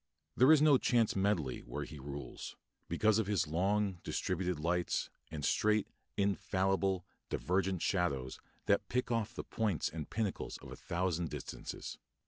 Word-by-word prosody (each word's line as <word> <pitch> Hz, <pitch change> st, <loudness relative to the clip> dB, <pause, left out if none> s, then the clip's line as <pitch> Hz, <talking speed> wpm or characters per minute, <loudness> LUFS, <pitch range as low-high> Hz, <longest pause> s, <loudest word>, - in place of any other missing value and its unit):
There 130 Hz, +4 st, +7 dB
is 155 Hz, -2 st, +7 dB
no 145 Hz, -4 st, +7 dB
chance 115 Hz, -3 st, +3 dB
medley 95 Hz, -9 st, +1 dB
where -, -, -5 dB
he 75 Hz, -, -9 dB
rules, 70 Hz, +1 st, -7 dB, 0.3 s
because 110 Hz, 0 st, +3 dB
of 110 Hz, -, 0 dB
his 100 Hz, -6 st, +2 dB
long, 95 Hz, +4 st, +1 dB
distributed 90 Hz, -1 st, -1 dB
lights, 85 Hz, +2 st, 0 dB, 0.2 s
and 75 Hz, -2 st, -4 dB
straight, 105 Hz, -1 st, +3 dB, 0.3 s
infallible, 95 Hz, -1 st, +1 dB, 0.2 s
divergent 95 Hz, 0 st, 0 dB
shadows 70 Hz, -9 st, 0 dB, 0.3 s
that -, -, +2 dB
pick 125 Hz, 0 st, 0 dB
off 115 Hz, -3 st, 0 dB
the -, -, -4 dB
points 105 Hz, -8 st, 0 dB
and 80 Hz, -2 st, -6 dB
pinnacles 110 Hz, -3 st, -2 dB
of -, -, -11 dB
a -, -, -6 dB
thousand 85 Hz, -2 st, -1 dB
distances. 75 Hz, -4 st, -6 dB
95 Hz, 145 wpm, -34 LUFS, 85-105 Hz, 0.3 s, There